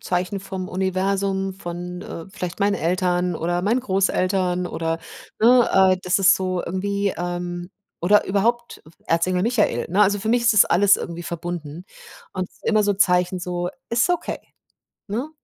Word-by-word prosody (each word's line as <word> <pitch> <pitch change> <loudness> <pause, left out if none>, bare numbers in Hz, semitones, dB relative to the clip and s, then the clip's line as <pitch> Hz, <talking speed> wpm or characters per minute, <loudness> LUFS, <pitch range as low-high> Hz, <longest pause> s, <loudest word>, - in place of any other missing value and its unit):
Zeichen 180 +2 -2
vom 190 -1 -6
Universum, 190 +1 -1
von, 180 0 -7
äh, 165 - -8
vielleicht 180 -2 -6
meinen 200 0 +2
Eltern 180 0 0
oder 175 +2 -1
meinen 230 +6 +1
Großeltern 185 -3 0
oder, 165 -1 -2 0.4
ne, 245 +1 +6
äh 190 -1 +5
das 180 +2 +1
ist 195 0 +6
so 185 -1 -2
irgendwie, 200 +2 -1
ähm 175 0 -4 0.3
oder 205 +5 +4
überhaupt 235 +5 0 0.3
Erzengel 180 +2 +1
Michael, 230 -1 +1
ne? 195 - +2
Also, 205 0 +2
für 220 - -4
mich 240 +1 +2
ist 235 - +4
das 210 - +7
alles 200 +3 +4
irgendwie 170 0 -6
verbunden 170 -1 -6 0.5
und 185 -1 -3
immer 215 -2 +2
so 205 - +1
Zeichen 180 -1 +2
so: 175 0 -3 0.2
„Ist 235 +7 +2
okay“, 355 -2 -1 0.7
ne? 235 +9 -3
185 Hz, 155 wpm, -22 LUFS, 175-200 Hz, 0.7 s, das